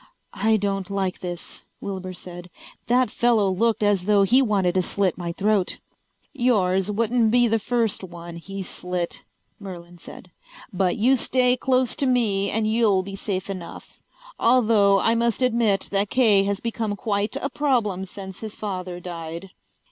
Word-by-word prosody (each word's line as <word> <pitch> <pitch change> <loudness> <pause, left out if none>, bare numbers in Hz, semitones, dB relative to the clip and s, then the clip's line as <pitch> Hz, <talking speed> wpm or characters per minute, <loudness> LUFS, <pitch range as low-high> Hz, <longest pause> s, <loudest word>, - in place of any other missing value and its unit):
"I 220 +2 +2
don't 195 -2 -2
like 195 -2 -2
this," 175 -1 -6 0.2
Wilbur 190 -2 -5
said. 175 0 -9 0.4
"That 250 +1 +2
fellow 235 -4 +2
looked 220 +3 +1
as 200 -3 +2
though 205 -1 +4
he 245 +7 +4
wanted 200 -7 +1
to 185 - +2
slit 190 0 0
my 175 -1 -4
throat." 200 +1 0 0.6
"Yours 195 -6 +1
wouldn't 225 +2 +1
be 245 +1 +4
the 225 0 +1
first 230 -3 -1
one 170 -1 -9
he's 195 +2 -7
slit," 180 -1 -4 0.4
Merlin 175 -3 -10
said. 180 - -12 0.4
"But 180 -1 0
you 250 +5 +4
stay 250 0 +2
close 255 -1 +1
to 280 - +1
me 210 -6 +2
and 220 +2 0
you'll 215 -4 +2
be 195 +1 -7
safe 195 -1 -3
enough. 185 -4 -9 0.4
Although 220 -5 +4
I 225 - +3
must 235 +1 +1
admit 225 -5 +2
that 200 0 0
Kay 215 -6 +4
has 200 0 -1
become 225 -3 -3
quite 205 +1 -2
a 275 - -2
problem 230 -10 0
since 190 0 -9
his 215 -2 -7
father 185 -4 -5
died." 170 +1 -7
200 Hz, 160 wpm, -23 LUFS, 185-230 Hz, 0.6 s, though